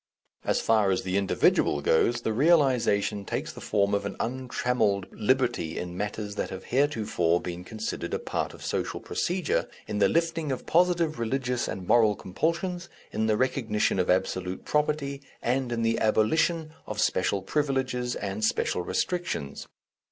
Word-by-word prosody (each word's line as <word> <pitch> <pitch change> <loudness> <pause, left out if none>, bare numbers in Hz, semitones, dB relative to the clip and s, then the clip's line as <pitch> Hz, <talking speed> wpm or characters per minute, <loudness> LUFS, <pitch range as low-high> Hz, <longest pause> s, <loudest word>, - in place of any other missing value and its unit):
As - - +1
far 110 -3 +3
as 95 - +1
the 95 0 -2
individual 100 -6 +2
goes, 115 +11 +2
the 110 - -1
realization 125 -8 +3
takes - - -4
the - - -10
form 100 -1 +1
of 100 0 +1
an 100 - -4
untrammelled 125 -5 0
liberty 115 -8 0
in 90 0 -5
matters 105 +1 -3
that - - -2
have 95 - -7
heretofore 110 - +1
been 90 0 -6
considered 110 +4 -4
a - - 0
part - - -3
of - - -10
social - - -2
procedure, 180 -2 -1 0.2
in 105 -1 -2
the 100 -1 +5
lifting 165 -3 0
of 130 - -4
positive 170 -4 +2
religious 125 +1 -1
and 95 -2 -5
moral 110 -3 +5
compulsions, 170 - -2 0.2
in 110 0 0
the 110 -1 +2
recognition 115 -6 +1
of 90 - 0
absolute 95 0 0
property, 150 -2 0 0.2
and 125 0 0
in 115 -1 -1
the 115 0 +1
abolition 155 +9 +2
of 105 -1 -4
special 95 -1 +1
privileges 130 -2 -1
and 100 +1 -4
special 110 - +1
restrictions. 130 - -2
115 Hz, 155 wpm, -27 LUFS, 100-140 Hz, 0.2 s, the